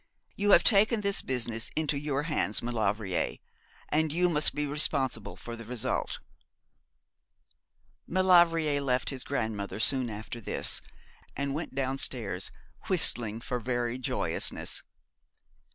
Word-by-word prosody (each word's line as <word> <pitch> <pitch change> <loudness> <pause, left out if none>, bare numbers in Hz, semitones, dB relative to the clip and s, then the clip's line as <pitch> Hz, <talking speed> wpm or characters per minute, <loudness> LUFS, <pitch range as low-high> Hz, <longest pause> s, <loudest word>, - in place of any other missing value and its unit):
You 205 +1 0
have 175 - +7
taken 215 +1 +4
this 200 -1 +2
business 120 -3 -2
into 155 -2 0
your 145 0 -1
hands, 150 -10 -1
Maulevrier; 105 -5 -1 0.5
and 155 0 +1
you 175 +3 +2
must 150 -3 +2
be 150 0 -1
responsible 140 -5 0
for 120 - -8
the 115 - -9
result.' 120 0 -2 1.9
Maulevrier 170 -5 +4
left 130 -1 +1
his 130 -1 -6
grandmother 110 -7 -3
soon 130 +1 +5
after 110 +2 -7
this, - - +1 0.6
and 140 0 -1
went 155 -2 -5
downstairs, 130 -8 -1 0.4
whistling 120 - +2
for 125 +1 -3
very 120 +1 -2
joyousness. 130 - -2
135 Hz, 120 wpm, -29 LUFS, 115-155 Hz, 1.9 s, have